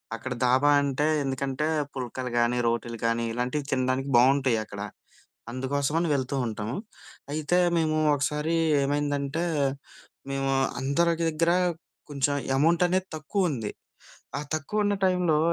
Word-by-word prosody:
అక్కడ 125 +3 -5
దాబా 130 +4 +4
అంటే 140 +2 0 0.2
ఎందుకంటే 135 +2 -2 0.3
పుల్కలు 125 0 -4
గానీ, 120 +1 +2
రోటీలు 115 -1 -2
గానీ, 115 0 +1
ఇలాంటివి 125 +5 -2
తినడానికి 130 +1 0
బావుంటాయి 130 -2 +4
అక్కడ. 100 -1 -8 0.7
అందుకోసమని 140 +6 -1
వెళ్తూ 135 0 -1
ఉంటాము. 110 +2 -4 0.6
అయితే 155 +4 +1 0.2
మేము 155 -1 +1 0.2
ఒకసారి 150 +3 -1 0.3
ఏమైందంటే, 145 +2 -1 0.9
మేము 135 0 -1 0.3
అందరి 155 +6 +2 0.2
దగ్గర 165 +2 +1 0.6
కొంచెం 145 0 0 0.2
అమౌంట్ 165 +4 +3
అనేది 185 +1 0
తక్కువ 180 +4 0
ఉంది. 115 -7 -3 0.7
ఆ - - -3
తక్కువ 155 +8 -1
ఉన్న 205 - +2
టైమ్‌లో 180 -4 +3
140 Hz, 120 wpm, -27 LUFS, 130-155 Hz, 0.9 s, దాబా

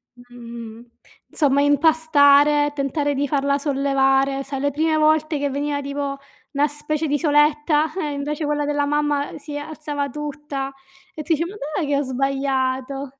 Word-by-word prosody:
Mh-mh. 235 -2 -11 0.4
Insomma 280 -2 +2
impastare, 290 -1 +4
tentare 285 +1 -1
di 285 +1 -1
farla 280 0 +1
sollevare, 275 -1 +1
sai 275 -1 -5
le 285 +1 0
prime 315 +2 +1
volte 310 0 +2
che 285 0 0
veniva 285 +1 -2
tipo 280 0 -4 0.4
una 285 +1 +2
specie 300 +1 -3
di 290 - +1
soletta, 300 +1 +2
eh, 305 -6 -2
invece 290 +2 -3
quella 295 0 0
della 290 0 0
mamma 295 0 -1
si 290 0 -7
alzava 290 -1 -4
tutta 285 -1 -5 0.4
e 310 - -5
tu 325 +3 +1
dici: 325 +2 0
"Ma 375 +4 -8
dov'è 305 -3 -3
che 285 0 +1
ho - - +1
sbagliato?" 270 0 -1
285 Hz, 155 wpm, -21 LUFS, 275-295 Hz, 0.4 s, impastare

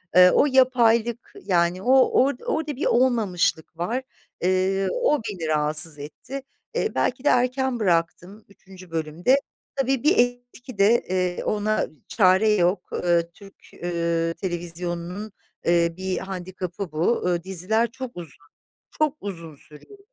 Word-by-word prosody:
Eee, 180 0 +8
o - - +5
yapaylık, 240 -3 +2
yani, 175 0 +1
o 250 - +1 0.3
or 280 +1 +1
orada 305 -3 -2
bir 275 - -3
olmamışlık 210 -10 +1
var. 235 +10 -2 0.4
Eee, 185 +2 +1
o 485 - +1
beni 170 -6 -5
rahatsız 155 0 +1
etti. 250 - -8 0.3
Eee, - - -1
belki 255 +2 0
de - - +4
erken 250 0 +1
bıraktım 180 +2 -1
3. 185 -3 -16
bölümde. 165 - +1 0.4
Tabii 270 -1 0
bir 330 +6 +4
etki 245 -1 -1
de, 215 +4 +4
eee, 180 -1 -1
ona 215 +1 0 0.2
çare 190 +1 +4
yok. 180 -2 +1
Iıı, 170 -1 +1
Türk, 195 0 -15 0.3
ııı, 170 -1 0
televizyonunun, 175 +3 -5 0.3
eee, 170 -1 +3
bir 190 0 -2
handikapı 185 -1 -6
bu. 165 +10 0
Iıı, 175 -1 0
diziler 200 +5 0
çok 260 -1 -7
uzun. 155 -3 -7 0.5
Çok 305 -1 +1
uzun 165 -6 -5
sürüyor. 155 - -14
190 Hz, 135 wpm, -24 LUFS, 170-240 Hz, 0.5 s, Eee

